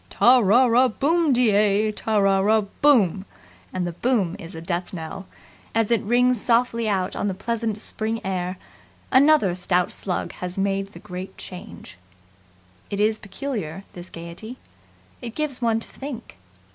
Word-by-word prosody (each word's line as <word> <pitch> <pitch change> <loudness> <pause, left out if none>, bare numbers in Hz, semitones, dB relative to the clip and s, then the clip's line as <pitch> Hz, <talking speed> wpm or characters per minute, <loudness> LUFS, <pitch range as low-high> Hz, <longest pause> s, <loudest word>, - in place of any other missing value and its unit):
"Ta 250 +1 +5
ra 235 +4 +5
ra 245 +2 +4
boom 310 +6 +1
de 245 -3 +4
ay 210 +1 +3
Ta 215 0 -1
ra 195 -1 +4
ra 215 +3 +3 0.2
BOOM 205 - +4 0.3
" 90 +1 -27
And 185 -1 -2
the 175 - -2
boom 195 -2 0
is 165 +2 -9
a - - -6
death 175 +2 -3
knell. 180 +3 -7 0.5
As 225 0 +1
it 230 -3 +3
rings 245 +1 +2
softly 235 -1 +1
out 190 -1 -1
on - - -1
the 190 - -2
pleasant 225 +1 -2
spring 220 +1 -3
air, 185 -1 -2 0.5
another 275 - +5
stout 180 0 0
slug 180 -3 -2
has 180 0 -7
made 195 0 -1
the - - -10
Great 180 +1 -8
Change. 180 - -10 0.9
It 200 - -3
is 215 +1 +2
peculiar, 200 - -5
this 175 0 -10
gaiety. 170 +9 -9 0.6
It 235 -2 -7
gives 295 -5 -3
one 225 -1 +2
to - - -11
think. 265 - -8
210 Hz, 165 wpm, -23 LUFS, 185-240 Hz, 0.9 s, Ta